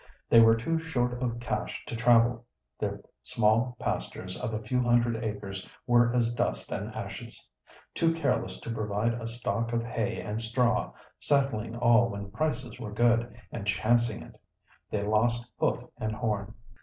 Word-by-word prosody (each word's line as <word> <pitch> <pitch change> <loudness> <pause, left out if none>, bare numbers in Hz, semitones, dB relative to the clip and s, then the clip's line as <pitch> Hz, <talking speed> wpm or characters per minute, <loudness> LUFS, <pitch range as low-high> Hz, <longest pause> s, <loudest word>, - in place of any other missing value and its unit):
They 115 - +9
were 115 0 +7
too 160 +9 -1
short 125 -6 -1
of 120 -2 -1
cash 125 +2 -3
to - - -5
travel. 120 0 +4 0.3
Their - - -2 0.2
small 115 +3 +2
pastures - - -3
of - - -3
a 110 0 -3
few 125 +4 0
hundred 120 -1 +2
acres 100 -3 -5 0.2
were 120 -1 +4
as 120 -1 +2
dust 65 - -1
and - - -3
ashes. - - -7 0.5
Too 165 -1 +2
careless 155 -5 0
to 115 - -4
provide 110 +1 0
a 115 -1 -5
stock 115 0 -2
of 115 0 +1
hay 115 -1 -2
and 105 +1 -3
straw, 120 +1 +1 0.3
selling 120 -6 +1
all 120 0 +4
when 100 -1 -6
prices 125 -2 -2
were 110 -4 -6
good, 120 +2 +2 0.2
and 100 - -5
"chancing 115 +3 +2
it," - - -16 0.5
they 105 -1 -1
lost 115 +3 +1
hoof - - +1 0.2
and 110 0 -2
horn. 110 -2 -2
115 Hz, 160 wpm, -29 LUFS, 110-120 Hz, 0.5 s, They